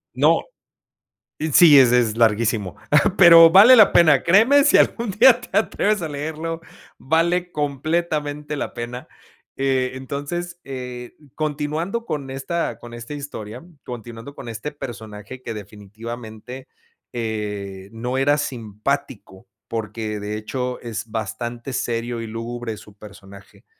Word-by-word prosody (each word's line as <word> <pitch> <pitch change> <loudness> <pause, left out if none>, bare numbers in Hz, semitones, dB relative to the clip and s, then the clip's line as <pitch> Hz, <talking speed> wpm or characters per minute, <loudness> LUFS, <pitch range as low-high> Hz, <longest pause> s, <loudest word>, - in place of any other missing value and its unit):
No, - - +4 1.1
sí, 155 -4 +8
ese 125 -2 +5
es 115 -2 -1
larguísimo, 110 -3 +1 0.4
pero 165 -2 +9
vale 205 +9 +8
la 215 -5 +7
pena, 155 -6 +5
créeme, 225 +11 +5
si 290 - +5
algún 235 -1 +1
día 240 +5 +5
te - - -3
atreves 210 -1 +1
a - - -2
leerlo, 160 +3 -5 0.4
vale 170 +4 0
completamente 150 0 -2
la 145 - -4
pena. 120 +1 -6 0.5
Eh, 130 -1 0
entonces, 145 +7 -5
eh, 125 -2 -8 0.2
continuando 155 +8 -3
con 145 - -4
esta 135 +6 -3
con 120 0 -12
esta 120 +4 -8
historia, 125 -5 -8 0.2
continuando 120 +2 -9
con - - -10
este 115 +6 -6
personaje 115 -3 -9
que 115 - -6
definitivamente, 110 +4 -9 0.4
eh, 105 -4 -5
no 120 +3 -4
era 145 +2 +3
simpático, 110 -7 -4 0.2
porque 110 -1 -4
de 105 +1 -4
hecho 125 +4 -4
es 115 -1 -6
bastante 120 +4 -5
serio 120 0 -3
y 115 - -6
lúgubre 115 0 -6
su 105 - -15
personaje. 100 -1 -15
125 Hz, 125 wpm, -21 LUFS, 110-155 Hz, 1.1 s, pero